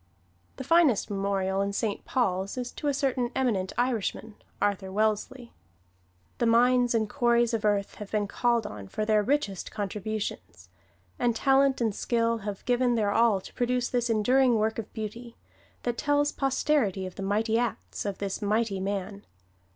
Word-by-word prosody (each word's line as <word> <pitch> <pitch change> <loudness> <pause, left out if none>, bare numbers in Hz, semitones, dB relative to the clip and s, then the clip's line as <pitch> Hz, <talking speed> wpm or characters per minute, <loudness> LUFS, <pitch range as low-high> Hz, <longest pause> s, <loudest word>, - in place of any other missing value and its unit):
The - - -6
finest 295 - +3
memorial 195 -1 0
in 200 0 -1
Saint 205 0 -2
Paul's 195 -4 -1
is 245 -1 -3
to 295 - -5
a - - +3
certain 260 -3 0
eminent 215 -8 0
Irishman, 230 -3 -1 0.3
Arthur 200 -2 -1
Wellesley. 220 +4 -1 0.9
The 235 - +2
mines 245 +1 +4
and 220 -1 +1
quarries 240 -1 +2
of 225 -1 -1
earth 205 -2 +1
have 205 - -6
been 210 -1 0
called 235 +1 +1
on 100 - -7
for 215 - -3
their 215 -1 +3
richest 210 -5 -1
contributions; 200 - -5 0.5
and 240 -2 +1
talent 270 +1 +3
and 225 -3 +1
skill 230 +1 0
have 205 -2 -6
given 245 0 +2
their 210 -3 +1
all 225 -2 +3
to - - -12
produce 245 0 0
this 245 -1 0
enduring 245 +3 +3
work 220 +1 0
of 220 - -6
beauty, 230 +2 -7 0.5
that 240 -1 -2
tells 290 0 +2
posterity 270 -8 0
of 185 - -7
the - - -8
mighty 220 +3 +1
acts 240 -2 -3
of 200 -2 -3
this 200 +1 -4
mighty 210 -1 0
man. 200 +1 -4
220 Hz, 165 wpm, -27 LUFS, 200-245 Hz, 0.9 s, mines